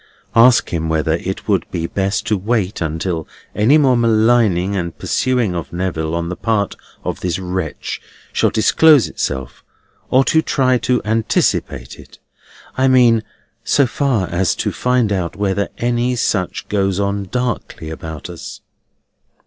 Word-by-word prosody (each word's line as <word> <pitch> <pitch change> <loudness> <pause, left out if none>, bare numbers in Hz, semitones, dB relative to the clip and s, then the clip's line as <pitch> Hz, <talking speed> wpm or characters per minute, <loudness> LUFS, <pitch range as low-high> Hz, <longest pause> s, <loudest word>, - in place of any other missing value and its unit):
"Ask 120 +1 +5
him 80 -1 -1
whether 80 0 0
it 95 +2 -5
would 100 -5 0
be 85 -2 -3
best 95 +3 -1
to 110 - +1
wait 105 -1 -1
until 80 +1 -2 0.3
any 115 +9 +4
more 135 -4 +4
maligning 110 -5 +3
and 85 -3 -3
pursuing 125 -7 0
of 85 -2 -5
Neville 85 -3 -2
on 85 0 -2
the 90 - -4
part 105 -2 -1 0.3
of - - -3
this 90 -3 -2
wretch 95 0 -4 0.3
shall - - +2
disclose 150 +5 +4
itself, 65 -1 -4 0.5
or 130 +1 +4
to 160 - +3
try 130 -5 +1
to 125 0 0
anticipate 105 - -1
it: - - -15 0.6
I 130 0 +2
mean, 120 -3 +5 0.4
so 140 - +3
far 125 -6 0
as 90 +1 +1
to - - -2
find 125 -4 +1
out 90 -4 -2
whether 100 0 -1
any 120 +1 0
such 100 -6 -1
goes 100 -2 0
on 100 0 -1
darkly 115 -8 -3
about 80 -2 -7
us?" - - -9
100 Hz, 150 wpm, -18 LUFS, 90-120 Hz, 0.6 s, Ask